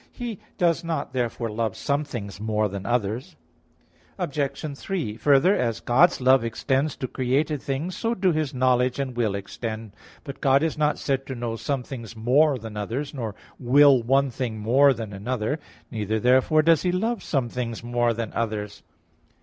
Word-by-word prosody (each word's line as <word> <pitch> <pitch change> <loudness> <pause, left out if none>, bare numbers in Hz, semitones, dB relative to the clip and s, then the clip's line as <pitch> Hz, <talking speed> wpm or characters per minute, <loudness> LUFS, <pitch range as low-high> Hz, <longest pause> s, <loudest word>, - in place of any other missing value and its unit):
He 235 -5 -6 0.2
does 170 -1 +2
not 160 -5 -3
therefore 120 -2 -2
love 110 -1 -2
some 140 +1 0
things 105 -9 -7
more 110 -1 +1
than 100 -1 -6
others. 120 +1 -1 0.8
Obj. 145 +1 -3
3: 150 - -3
Further, 145 - +4
as 115 -2 -1
God's 150 +9 +4
love 130 -1 +4
extends 130 +6 0
to 130 - -4
created 135 +4 0
things, 145 +7 -3
so 230 0 -1
do 190 -2 +2
His 155 -4 -1
knowledge 125 -1 +2
and 135 -3 -3
will 110 -4 0
extend. 110 +2 -6 0.3
But 140 -3 -8
God 135 +2 +4
is 160 - 0
not 150 -1 +1
said 135 -1 -2
to 130 - -4
know 120 -1 -3
some 135 +2 -2
things 115 -4 -8
more 135 +6 +3
than 110 -2 -8
others; 120 +9 -3
nor 115 -7 -4 0.2
will 135 +1 +6
one 135 +3 +2
thing 120 -2 -3
more 130 +7 +4
than 110 -4 -4
another. 115 +7 -2 0.3
Neither 110 -1 -1
therefore 130 +6 +4
does 165 -1 +4
He 180 - +1
love 220 +5 -1
some 135 -5 -1
things 115 -1 -4
more 120 0 +1
than 115 -1 -4
others. 105 -2 -3
130 Hz, 175 wpm, -25 LUFS, 115-145 Hz, 0.8 s, will